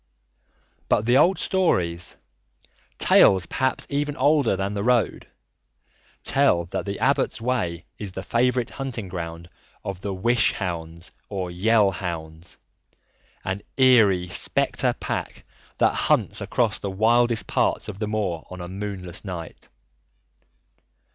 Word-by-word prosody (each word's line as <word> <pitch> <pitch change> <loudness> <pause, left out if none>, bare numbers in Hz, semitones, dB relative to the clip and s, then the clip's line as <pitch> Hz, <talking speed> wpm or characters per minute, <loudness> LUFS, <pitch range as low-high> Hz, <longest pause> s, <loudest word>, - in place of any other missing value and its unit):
But 105 - +2
the 120 +2 +3
old 180 +5 +4
stories 90 - 0 0.8
tales 95 -2 +5
perhaps 130 +7 -1
even 145 0 -2
older 145 -4 +3
than 95 +1 -2
the 100 - -2
road 120 +1 +1 1.0
tell 85 -1 +2
that 85 - -4
the 100 0 -3
Abbot's 130 +2 +1
Way 110 -9 -2
is 100 -3 -6
the 95 - -6
favourite 125 +1 +1
hunting 120 -7 -5
ground 85 -1 -6 0.4
of 95 -2 -5
the 100 - -3
Wish 115 +5 +2
Hounds 85 -2 -5 0.2
or 95 -3 -4
Yell 105 +3 +3
Hounds, 85 -3 -6 0.9
an 95 +1 -2 0.2
eerie 110 -9 +5
spectre 90 - +1
pack - - -4 0.3
that - - +3
hunts - - +1
across - - 0
the 100 - -4
wildest 115 +4 +2
parts - - 0
of 100 -2 -7
the 105 - -2
moor 100 -6 -2
on 90 - -8 0.2
moonless 95 -4 -6
nights. 90 -5 -8
100 Hz, 125 wpm, -24 LUFS, 90-120 Hz, 1.0 s, tales